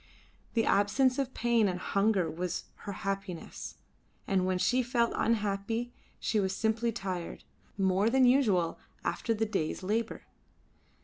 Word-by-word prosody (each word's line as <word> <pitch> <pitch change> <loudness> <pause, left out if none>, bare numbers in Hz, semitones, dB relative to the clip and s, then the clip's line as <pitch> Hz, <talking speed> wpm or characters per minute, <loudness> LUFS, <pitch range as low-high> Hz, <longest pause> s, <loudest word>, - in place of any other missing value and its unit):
The 225 - +3
absence 255 +6 +3
of 265 -1 -1
pain 235 -3 +3
and 180 -1 -2
hunger 200 -2 +2
was 175 +2 -3 0.3
her - - -1
happiness, 195 -2 -5 0.5
and 185 -2 +1
when 185 -1 +1
she 250 +7 +2
felt 240 -1 +1
unhappy 225 +2 0 0.3
she 215 - +1
was 190 -1 0
simply 225 +1 +1
tired, 185 -5 -5 0.3
more 195 +2 +3
than 260 +1 +5
usual, 215 -10 +3 0.2
after 230 - -1
the 220 +1 +1
day's 190 -5 -2
labour. 225 +4 -1
210 Hz, 135 wpm, -30 LUFS, 190-235 Hz, 0.5 s, than